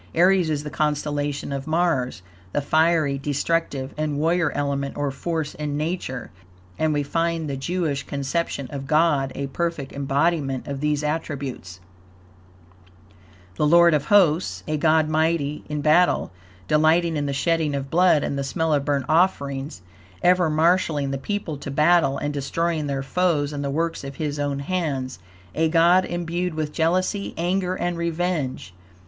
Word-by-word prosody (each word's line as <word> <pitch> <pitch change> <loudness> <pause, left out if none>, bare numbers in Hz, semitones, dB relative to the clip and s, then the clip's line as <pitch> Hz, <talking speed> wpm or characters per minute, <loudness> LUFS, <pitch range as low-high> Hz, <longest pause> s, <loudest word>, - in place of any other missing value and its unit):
Aries 180 0 +4
is 150 -2 -1
the 150 - -6
constellation 145 -1 -1
of 140 +1 -4
Mars, 155 - 0 0.3
the 145 - +1
fiery, 155 -2 +2
destructive 145 -1 -1
and 150 -1 -2
warrior 165 +1 +1
element, 140 -1 -2
or 145 -1 -1
force, 160 +2 -3
in 150 -1 -3
Nature, 155 -5 -3 0.5
and 155 0 +2
we 145 -1 0
find 165 +1 -1
the 140 - -3
Jewish 150 0 -2
conception 140 0 -3
of 135 -2 -6
God 150 -3 +2
a 140 - -3
perfect 155 0 -3
embodiment 140 0 0
of 140 -1 -4
these 150 0 0
attributes: 140 - -4 1.8
The 150 - +2
Lord 170 +1 +6
of 150 -1 +1
Hosts, 185 -4 +3
a 155 - 0
God 155 0 +3
mighty 155 -2 0
in 150 -1 -2
battle, 160 +4 +3 0.4
delighting 160 - +3
in 145 -1 -1
the - - -1
shedding 155 +1 0
of 135 -1 -4
blood 175 -3 +4
and 140 - -2
the - - -1
smell 160 +3 0
of 145 -2 +1
burnt 140 -2 0
offerings, 140 - 0 0.4
ever 180 -2 +4
marshalling 155 -3 +2
the 135 - -3
people 190 -3 -3
to 140 - -7
battle 150 -1 +3
and 145 +1 -3
destroying 155 +2 -1
their 135 -1 -2
foes 150 -1 0
and 145 -1 -3
the 140 - -2
works 165 +3 -2
of 135 0 -7
his 150 -1 -3
own 145 -1 -1
hands; 140 - -2 0.3
a 160 0 +1
God 175 +3 +4
imbued 175 0 -3
with 155 -1 -3
jealousy, 185 +5 0
anger, 180 +2 0
and 175 -2 -2
revenge. 170 - -2
150 Hz, 155 wpm, -23 LUFS, 140-170 Hz, 1.8 s, Lord